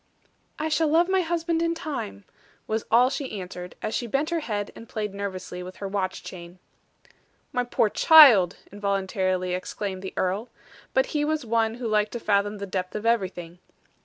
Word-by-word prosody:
"I 310 - -2
shall 315 0 +2
love 330 +3 +4
my 380 0 +3
husband 335 -1 -1
in 335 0 +1
time," 270 - -5 0.4
was 220 0 -2
all 245 +3 +5
she 270 -7 -4
answered, 180 -1 -8
as 215 - -2
she 240 - -2
bent 280 +7 -1
her 340 - +1
head, 210 -8 -3
and 230 - -12
played 210 -2 -3
nervously 190 -2 -5
with 185 +1 -8
her 200 - -5
watch 195 -1 -3
chain. 175 0 -10 1.0
"My 250 - +1
poor 245 -2 +1
child!" 225 - +7
involuntarily 190 -2 -1
exclaimed 190 +1 -4
the 190 - -7
earl. 195 +6 -1 0.5
But - - +4
he 295 -1 +1
was 310 -2 -1
one 225 0 +1
who 240 -1 -4
liked 210 -1 +1
to 240 - -3
fathom 205 -1 +1
the 200 - -5
depth 185 -1 -4
of 210 +1 -4
everything. 185 -6 -1
210 Hz, 180 wpm, -25 LUFS, 190-275 Hz, 1.0 s, child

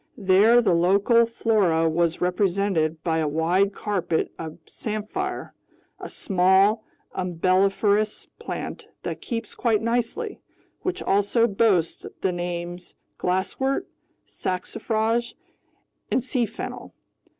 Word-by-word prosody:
There 215 +4 +5
the 185 - +3
local 200 +7 +4
flora 200 -8 +2
was 165 +1 0
represented 180 -3 +1
by 160 -1 +1
a 155 - +1
wide 170 +6 +2
carpet 185 -6 -1
of 160 -1 -6
samphire, 215 -1 -4 0.5
a - - -7
small 195 +3 +3 0.3
umbelliferous 195 +4 +1
plant - - -6 0.2
that - - -4
keeps 230 -3 -4
quite 225 -3 +1
nicely, 245 - -1 0.4
which 370 - -2
also 205 +4 +3
boasts 195 -6 +1
the 190 - +1
names 175 0 -5 0.2
glasswort, 190 +9 0 0.4
saxifrage, 225 +5 -2 0.7
and 255 - +1
sea 250 -2 0
fennel. 220 - -7
195 Hz, 105 wpm, -24 LUFS, 175-225 Hz, 0.7 s, There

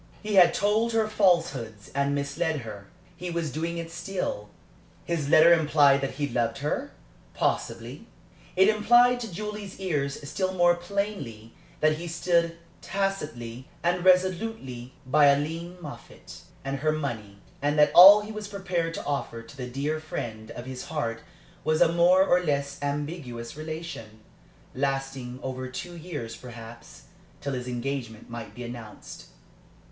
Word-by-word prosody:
He 210 0 -3
had 175 -3 +7
told 215 +3 +2
her 220 -1 +2
falsehoods 165 - +1
and 140 +1 +1
misled 145 +2 -1
her. 105 -3 -9 0.3
He 180 - -6
was 170 -3 -2
doing 165 +5 -3
it 165 0 -5
still. 175 - -4 0.6
His 160 -4 -2
letter 165 +3 +8
implied 145 -4 +4
that 135 -1 -3
he 145 0 -1
loved 120 -3 -1
her? 150 - -2 0.5
Possibly. - - -2 0.5
It 190 +1 +6
implied 240 +3 +5
to 230 -4 -6
Julie's 210 +1 -6
ear 150 -7 0
still 185 +7 -3
more 175 -1 +5
plainly 175 - -4 0.3
that 155 0 +3
he 175 - -5
stood 170 0 +1 0.2
tacitly 150 -11 -3
and 175 +1 +1
resolutely 185 - +1
by 145 +2 +5
Aileen 165 +5 -1
Moffatt 150 -5 -11 0.2
and 135 0 -2
her 155 +2 +2
money, 115 -10 -4 0.2
and 145 +1 +1
that 150 0 +5
all 200 +4 +11
he 210 +1 -7
was 215 -1 -6
prepared 180 -5 -2
to - - -6
offer 140 -5 -3
to 140 +5 -14
the 125 -2 -5
dear 140 +5 -2
friend 110 -8 -6
of 120 +1 -8
his 130 -1 -6
heart 115 -7 -3 0.4
was 155 +1 +1
a 165 -1 +4
more 180 +2 +5
or 180 -1 +3
less 140 -3 -1
ambiguous 145 -5 -4
relation, 155 -9 -7 0.5
lasting 135 -2 -3
over 130 0 -4
two 175 +7 -7
years 155 -9 -6
perhaps 120 -1 -11 0.4
till 140 - -3
his 125 -1 -4
engagement 120 -3 -4
might 115 -2 -7
be 125 - -7
announced. 120 -3 -9
150 Hz, 150 wpm, -27 LUFS, 130-175 Hz, 0.6 s, all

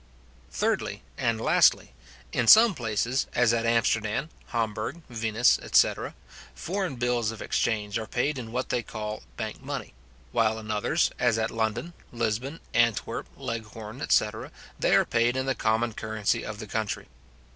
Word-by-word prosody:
Thirdly, - - -1
and 115 -2 0
lastly, 90 - +4 0.4
In 120 -2 0
some 220 - +9
places, 115 - -1
as 120 -2 +4
at 115 0 +1
Amsterdam, 115 +4 +1 0.2
Hamburg, 115 +8 -3
Venice, 115 +1 +3
etc. - - +2 0.4
foreign 185 - -3
bills 120 -2 0
of 115 -1 -6
exchange 110 -1 -1
are 110 - -6
paid 135 +3 -1
in 115 -2 -7
what 125 +2 -2
they 120 - +1
call 105 -1 -5 0.2
bank - - -5
money; - - -5 0.4
while 110 -2 +2
in 110 -1 -6
others, 110 +10 +1
as 120 -3 +3
at 115 0 -1
London, 115 +8 -2 0.2
Lisbon, 120 +6 -2
Antwerp, 115 -2 +1
Leghorn, 110 +1 -6
etc. 110 -4 +1 0.3
they - - +3
are - - +5
paid 120 +2 +1
in 130 - -1
the 135 - +1
common 115 0 0
currency 110 -1 -1
of 110 -1 -6
the 110 - -7
country. 105 -2 -3
115 Hz, 150 wpm, -27 LUFS, 110-125 Hz, 0.4 s, some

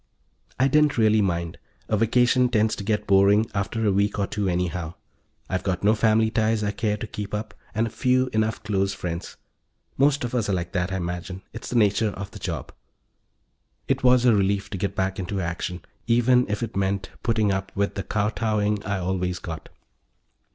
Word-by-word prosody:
I 130 - +4
didn't 150 0 +3
really 110 -1 +4
mind: 85 -4 -2 0.3
a 110 - +1
vacation 125 +3 +3
tends 110 -2 +2
to - - -5
get 105 +1 0
boring 100 +2 +5
after 105 +3 -1
a 105 - +4
week 100 +2 +1
or 100 - +1
two 100 0 -2
anyhow. 85 -2 -2 0.5
I've 95 - -1
got 95 -1 -2
no 105 +2 +5
family 110 0 +3
ties 110 -1 +1
I 100 - 0
care 105 -1 -1
to 105 - -5
keep 105 -1 -5
up, 105 0 -5 0.2
and 110 +1 0
few 130 +2 +2
enough 110 0 0
close 100 -2 0
friends. 85 0 -5 0.6
Most 140 0 +3
of 120 0 -3
us 115 -5 0
are - - +1
like 85 -2 -2
that; 90 -1 -1
I - - -1
imagine 90 +1 -4
it's - - -7
in 125 - +1
the 110 - +6
nature 105 +2 +1
of 100 0 -7
the - - -10
job. - - -4 1.2
It 135 0 0
was 125 -1 +5
a 120 - +6
relief 100 0 +1
to 95 - -3
get 100 +1 -2
back 95 0 -1
into 95 +2 -3
action, 90 0 -4 0.2
even 120 +1 +3
if 105 +2 -2
it 115 - -5
meant 95 0 -1
putting 110 -3 +1
up 95 0 -2
with 100 0 0
the 100 - -3
kowtowing 105 0 0
I 100 0 -2
always 90 -1 -1
got. 80 -2 -7
105 Hz, 195 wpm, -24 LUFS, 95-110 Hz, 1.2 s, the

